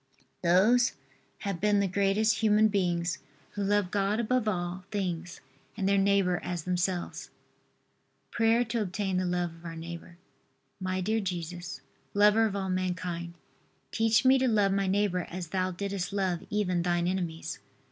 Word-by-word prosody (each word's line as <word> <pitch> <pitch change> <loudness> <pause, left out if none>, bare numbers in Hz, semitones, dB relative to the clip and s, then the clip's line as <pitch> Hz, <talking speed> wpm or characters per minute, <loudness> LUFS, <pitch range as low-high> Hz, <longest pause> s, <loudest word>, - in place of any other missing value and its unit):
Those 205 +8 +4 0.5
have 195 -4 -3
been 210 0 +3
the 200 - +2
greatest 200 +2 +2
human 215 0 +4
beings 175 -4 0 0.3
who 205 - -3
loved 200 -2 +1
God 205 +2 +1
above 235 0 +1
all 180 -2 -2
things 180 -4 -3 0.4
and 195 -3 0
their 200 0 +3
neighbor 195 -2 +2
as 175 -3 -3
themselves. 180 0 -2 1.0
PRAYER 230 +1 +3
TO 230 0 -1
OBTAIN 195 -1 -1
THE 185 0 0
LOVE 175 -1 -1
OF 165 - -18
OUR 165 -1 -6
NEIGHBOR. 170 +1 -8 0.6
My 185 0 -2
dear 220 +4 +1
Jesus, 180 -2 -5 0.3
lover 210 +2 +5
of 200 - -4
all 190 -1 -2
mankind, 180 -2 -3 0.6
teach 225 +1 +2
me 265 +1 +6
to 260 - +2
love 205 -4 +3
my 195 0 +1
neighbor 190 -2 +1
as 175 -2 -6
Thou 185 +1 0
didst 195 0 -3
love 190 -4 -1
even 185 -4 0
Thine 175 0 +1
enemies. 175 -3 -3
190 Hz, 155 wpm, -29 LUFS, 175-205 Hz, 1.0 s, me